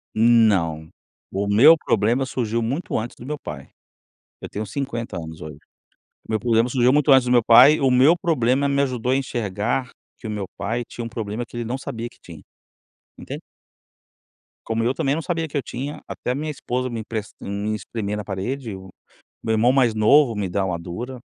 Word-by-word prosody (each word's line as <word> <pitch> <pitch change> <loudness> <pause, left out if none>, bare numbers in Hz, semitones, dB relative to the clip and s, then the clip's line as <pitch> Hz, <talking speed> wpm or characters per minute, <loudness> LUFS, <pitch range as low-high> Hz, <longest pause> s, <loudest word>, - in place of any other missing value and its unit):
Não, 100 -9 +3 0.4
o 100 +1 -2
meu 120 +11 +7
problema 120 -2 +1
surgiu 115 -2 -1
muito 135 +10 -3
antes 115 +2 -6
do - - -12
meu 150 +2 -4
pai. 75 - -8 0.7
Eu - - -6
tenho 105 +1 -5
50 120 -4 -4
anos 80 -1 -7
hoje. 75 -2 -8 0.7
O - - -6
meu 110 - +1
problema 115 +1 +2
surgiu 125 0 +3
muito 145 0 +3
antes 130 -2 +6
do 125 - -1
meu 120 -2 +5
pai, 125 +7 +7
o 135 -2 +2
meu 135 +7 +6
problema 140 -4 +1
me 140 0 +1
ajudou 125 -2 -1
a - - +3
enxergar 120 -1 -2 0.3
que - - -15
o 110 - -3
meu 100 -2 -4
pai 115 +4 -2
tinha 120 - -7
um - - -5
problema 110 +1 -4
que - - -15
ele 120 - -2
não 125 +4 -3
sabia 120 -2 -6
que - - -24
tinha, 80 -4 -12 0.8
entende? - - -7 1.3
Como 115 0 -1
eu 120 +3 +1
também 135 +1 0
não 160 - -2
sabia 165 -1 -2
que 145 - -4
eu - - +1
tinha, 135 +4 -6
até 125 - -4
a - - -1
minha 155 +3 -3
esposa 130 -3 -3
me 115 -2 -4
empresta 110 -1 -6
me 100 +2 -3
espremer 105 -1 -4
na 105 - -4
parede, 110 +4 -4
o 95 0 -11 0.5
meu 110 - -1
irmão 115 +3 +3
mais 125 -4 +3
novo 120 +3 +4
me 100 -2 -2
dá 95 +2 -1
uma 90 -3 -2
dura, 120 +10 -7
115 Hz, 205 wpm, -22 LUFS, 105-130 Hz, 1.3 s, meu